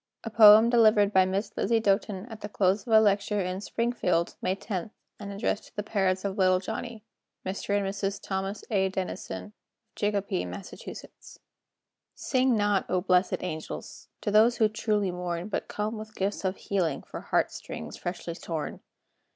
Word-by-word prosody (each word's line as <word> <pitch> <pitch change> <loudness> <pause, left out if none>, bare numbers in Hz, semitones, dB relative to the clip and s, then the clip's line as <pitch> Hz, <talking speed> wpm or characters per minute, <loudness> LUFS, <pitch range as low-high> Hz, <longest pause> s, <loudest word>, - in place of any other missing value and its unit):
[A 225 - -5
poem 215 0 +9
delivered 215 -3 +5
by 190 -1 +6
Miss 195 +3 -2
Lizzie 230 +2 +2
Doten 200 -2 0
at 220 - -9
the 205 - -5
close 195 +2 +1
of - - -4
a 220 - +9
lecture 205 0 +2
in 185 0 -2
Springfield, 210 -8 0
May 185 +1 0
10, 195 -1 -4 0.3
and 200 -1 -6
addressed 205 +1 -2
to - - -19
the 210 - -2
parents 190 -2 0
of 200 +1 -3
Little 185 -1 +4
Johnny 220 +3 -6 0.4
Mr. 200 +2 -1
and 200 - -1
Mrs. 195 0 -2
Thomas 195 +1 -4
A. 190 -2 +2
Denison, 185 -1 -4
of 210 - -13 0.4
Chicopee, 200 -2 -1
Mass.] 200 - -7 1.4
Sing 260 -2 +1
not, 205 -2 +1
O 185 0 +1
blessed 180 0 +2
angels! 160 -3 -6
To 205 - -1
those 225 +3 +5
who 220 - +4
truly 210 -3 0
mourn, 175 +1 -4
But - - -3
come 215 +1 -3
with 215 0 -10
gifts 200 +2 -2
of 190 0 0
healing, 185 -5 -1
For - - -8
heart - - +1
strings 75 -1 -7
freshly 175 -1 -5
torn. 165 -2 -5
200 Hz, 170 wpm, -28 LUFS, 185-215 Hz, 1.4 s, poem